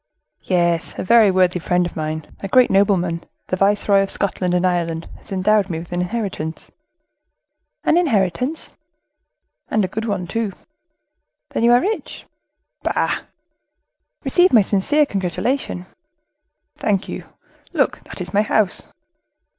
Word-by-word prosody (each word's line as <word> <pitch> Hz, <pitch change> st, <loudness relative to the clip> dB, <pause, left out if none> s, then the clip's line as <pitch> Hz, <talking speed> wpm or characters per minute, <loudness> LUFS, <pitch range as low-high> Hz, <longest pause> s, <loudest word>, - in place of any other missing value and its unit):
"Yes, 170 Hz, -2 st, 0 dB
a -, -, -2 dB
very 220 Hz, +1 st, +6 dB
worthy 185 Hz, -1 st, +2 dB
friend 180 Hz, +1 st, +1 dB
of 175 Hz, -, -6 dB
mine, 155 Hz, 0 st, -3 dB
a 195 Hz, -, -4 dB
great 250 Hz, +5 st, +4 dB
nobleman, 185 Hz, -4 st, +2 dB, 0.3 s
the -, -, +1 dB
viceroy 200 Hz, +1 st, +3 dB
of 195 Hz, -, -1 dB
Scotland 185 Hz, -2 st, -1 dB
and 180 Hz, +1 st, +2 dB
Ireland, 170 Hz, -2 st, -1 dB
has -, -, -20 dB
endowed 200 Hz, +1 st, +2 dB
me 165 Hz, -, -2 dB
with 165 Hz, +1 st, -8 dB
an 175 Hz, 0 st, -1 dB
inheritance." 180 Hz, -5 st, -4 dB, 1.1 s
"An 320 Hz, -, +3 dB
inheritance?" 255 Hz, -, 0 dB, 1.0 s
"And 215 Hz, -3 st, +2 dB
a -, -, -2 dB
good 220 Hz, +4 st, -4 dB
one, 200 Hz, -5 st, -2 dB
too." 215 Hz, +2 st, -2 dB, 1.0 s
"Then -, -, -2 dB
you 235 Hz, -, +5 dB
are 245 Hz, +1 st, +6 dB
rich?" 430 Hz, +3 st, -3 dB, 0.6 s
"Bah!" -, -, 0 dB, 1.0 s
"Receive 360 Hz, +1 st, +4 dB
my 220 Hz, -4 st, +6 dB
sincere 250 Hz, +11 st, +2 dB
congratulation." 195 Hz, 0 st, -2 dB, 0.9 s
"Thank 200 Hz, -3 st, 0 dB
you! -, -, -6 dB, 0.5 s
Look, -, -, +1 dB
that -, -, -10 dB
is -, -, -6 dB
my 205 Hz, -, +4 dB
house." 215 Hz, -2 st, 0 dB
195 Hz, 140 wpm, -20 LUFS, 180-220 Hz, 1.1 s, very